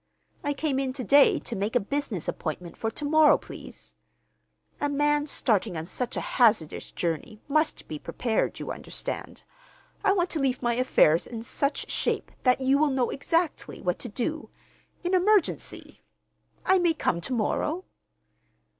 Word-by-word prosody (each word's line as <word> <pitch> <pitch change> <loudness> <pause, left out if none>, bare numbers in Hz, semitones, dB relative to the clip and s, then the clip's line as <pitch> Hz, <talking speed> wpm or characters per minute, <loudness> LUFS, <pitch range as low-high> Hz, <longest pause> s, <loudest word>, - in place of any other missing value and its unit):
I 290 -1 0
came 280 -2 -1
in 265 -1 -1
to 260 -1 -4
day 280 +3 +6
to 235 - -5
make 205 +5 -2
a - - +6
business 235 - -3
appointment 170 +2 -4
for 225 - -2
to 290 - -4
morrow, 310 +1 +6
please. - - -11 0.9
A 290 - 0
man 295 +1 +2
starting 215 - 0
on 160 - -4
such 240 +7 -3
a - - 0 0.2
hazardous 215 -10 +3
journey 175 +6 -3
must 310 +2 0
be 155 - -6
prepared, 230 +6 -1
you - - -4
understand. - - -5 0.6
I 400 -1 +4
want 360 -2 0
to 320 - -1
leave 265 -2 +1
my 240 0 +2
affairs 230 -10 +3
in 225 -2 -6
such 280 +4 -2
shape - - -1
that 250 0 +3
you 265 +2 +3
will 305 0 +4
know 260 -3 0
exactly 330 +4 -1
what 180 -1 -1
to 245 - -5
do—in 315 - -6
emergency. 380 0 +1 0.6
I 380 0 +5
may 345 -2 +2
come 170 - 0
to 255 - -3
morrow?" 300 - -1
265 Hz, 160 wpm, -27 LUFS, 220-300 Hz, 0.9 s, day